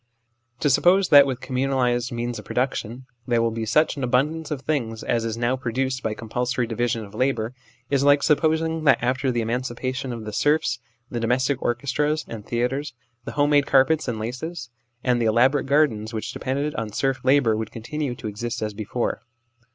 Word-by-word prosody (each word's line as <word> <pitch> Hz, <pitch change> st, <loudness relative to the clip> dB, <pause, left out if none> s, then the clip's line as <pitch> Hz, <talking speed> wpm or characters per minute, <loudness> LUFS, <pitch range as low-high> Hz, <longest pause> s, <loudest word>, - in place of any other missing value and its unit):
To 145 Hz, -, +3 dB
suppose 185 Hz, +7 st, +4 dB
that 140 Hz, -1 st, +8 dB
with 130 Hz, -1 st, -3 dB
communalised 130 Hz, -2 st, 0 dB
means 120 Hz, 0 st, -3 dB
of -, -, -11 dB
production 125 Hz, -1 st, -2 dB, 0.2 s
there 120 Hz, -2 st, +2 dB
will 115 Hz, 0 st, +1 dB
be 110 Hz, 0 st, -4 dB
such 155 Hz, +6 st, +2 dB
an 135 Hz, -, -3 dB
abundance 145 Hz, +6 st, 0 dB
of 145 Hz, -3 st, -3 dB
things 120 Hz, -7 st, -2 dB
as 115 Hz, -1 st, 0 dB
is 115 Hz, 0 st, -3 dB
now 120 Hz, +2 st, +1 dB
produced 130 Hz, +1 st, -2 dB
by 110 Hz, -1 st, -2 dB
compulsory 125 Hz, +3 st, -2 dB
division 115 Hz, 0 st, -1 dB
of 100 Hz, -, -15 dB
labour, 120 Hz, -1 st, 0 dB, 0.4 s
is 140 Hz, -1 st, +2 dB
like 145 Hz, 0 st, +5 dB
supposing 160 Hz, +1 st, +2 dB
that 135 Hz, -5 st, +6 dB
after 130 Hz, +2 st, 0 dB
the 120 Hz, -2 st, 0 dB
eman 115 Hz, +2 st, 0 dB
cipation 130 Hz, +1 st, -4 dB
of 115 Hz, -2 st, -6 dB
the 105 Hz, -, -6 dB
serfs 145 Hz, -2 st, +1 dB, 0.3 s
the 120 Hz, -, -2 dB
domestic 130 Hz, +4 st, +1 dB
orchestras 145 Hz, +5 st, 0 dB
1 -, -, -9 dB
and 105 Hz, -2 st, -10 dB
theatres, 125 Hz, +3 st, -2 dB, 0.3 s
the -, -, -6 dB
home 145 Hz, 0 st, +2 dB
made 145 Hz, -1 st, +4 dB
carpets 140 Hz, +3 st, +3 dB
and 120 Hz, -3 st, -2 dB
laces, 125 Hz, +3 st, -5 dB, 0.3 s
and 125 Hz, -2 st, +2 dB
the 115 Hz, -, +2 dB
elaborate 130 Hz, +6 st, +3 dB
gardens 120 Hz, -7 st, +2 dB
which 110 Hz, -, -4 dB
depended 140 Hz, +3 st, -2 dB
on 110 Hz, -2 st, -4 dB
serf 135 Hz, +4 st, -1 dB
labour 130 Hz, -4 st, +4 dB
would 110 Hz, 0 st, -3 dB
continue 125 Hz, +4 st, -4 dB
to 115 Hz, -, -7 dB
exist 110 Hz, +2 st, -4 dB
as 105 Hz, -1 st, -3 dB
before. 110 Hz, +3 st, -3 dB
125 Hz, 190 wpm, -24 LUFS, 115-140 Hz, 0.4 s, that